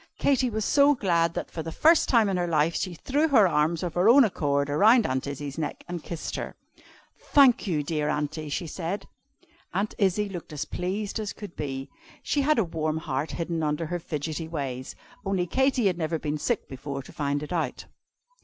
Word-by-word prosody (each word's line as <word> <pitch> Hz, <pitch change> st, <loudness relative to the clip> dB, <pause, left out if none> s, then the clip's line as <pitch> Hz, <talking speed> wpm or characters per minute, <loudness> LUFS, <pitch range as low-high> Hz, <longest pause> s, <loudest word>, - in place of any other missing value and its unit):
Katy 260 Hz, -2 st, +2 dB
was 220 Hz, -2 st, -2 dB
so 285 Hz, 0 st, +5 dB
glad, 170 Hz, -7 st, +1 dB
that, -, -, -4 dB
for 165 Hz, -, -4 dB
the 165 Hz, +1 st, -5 dB
first 320 Hz, -, +4 dB
time 230 Hz, -4 st, +4 dB
in 195 Hz, -, 0 dB
her 175 Hz, -1 st, 0 dB
life, 160 Hz, 0 st, +2 dB
she 185 Hz, -3 st, -2 dB
threw 290 Hz, -, +1 dB
her 225 Hz, -10 st, +5 dB
arms 160 Hz, +1 st, +1 dB
of 175 Hz, -, -3 dB
her 180 Hz, +5 st, +4 dB
own 270 Hz, +3 st, +8 dB
accord 140 Hz, -9 st, 0 dB
round 215 Hz, -, +5 dB
Aunt 130 Hz, +1 st, -1 dB
Izzie's 140 Hz, +1 st, -5 dB
neck, 150 Hz, -, -4 dB
and 175 Hz, -2 st, -5 dB
kissed 170 Hz, -2 st, -5 dB
her. -, -, -5 dB, 0.6 s
"Thank 265 Hz, -5 st, +4 dB
you, 155 Hz, -5 st, 0 dB
dear 150 Hz, 0 st, -1 dB
Aunty!" 150 Hz, +1 st, -2 dB
she 160 Hz, +4 st, -2 dB
said. 170 Hz, +4 st, -4 dB, 0.7 s
Aunt 200 Hz, +3 st, 0 dB
Izzie 200 Hz, +1 st, +2 dB
looked 175 Hz, -5 st, -8 dB
as 150 Hz, +1 st, -3 dB
pleased 195 Hz, +6 st, -3 dB
as 210 Hz, -2 st, -4 dB
could 205 Hz, -5 st, -10 dB
be. 135 Hz, -2 st, -4 dB, 0.4 s
She 290 Hz, -, +1 dB
had 305 Hz, +1 st, +3 dB
a 225 Hz, -, +4 dB
warm 160 Hz, -2 st, -2 dB
heart 150 Hz, -2 st, -3 dB
hidden 170 Hz, -1 st, -2 dB
under 150 Hz, +1 st, -1 dB
her 175 Hz, +3 st, -3 dB
fidgety 160 Hz, 0 st, -4 dB
ways 135 Hz, -5 st, -5 dB, 0.3 s
only 195 Hz, -2 st, 0 dB
Katy 260 Hz, +4 st, +1 dB
had 180 Hz, -3 st, +1 dB
never 160 Hz, 0 st, -1 dB
been 150 Hz, -1 st, -3 dB
sick 235 Hz, +6 st, -1 dB
before, 140 Hz, +1 st, -6 dB
to -, -, -14 dB
find 145 Hz, 0 st, -1 dB
it 150 Hz, -, -5 dB
out. 165 Hz, -3 st, -2 dB
170 Hz, 200 wpm, -26 LUFS, 150-210 Hz, 0.7 s, own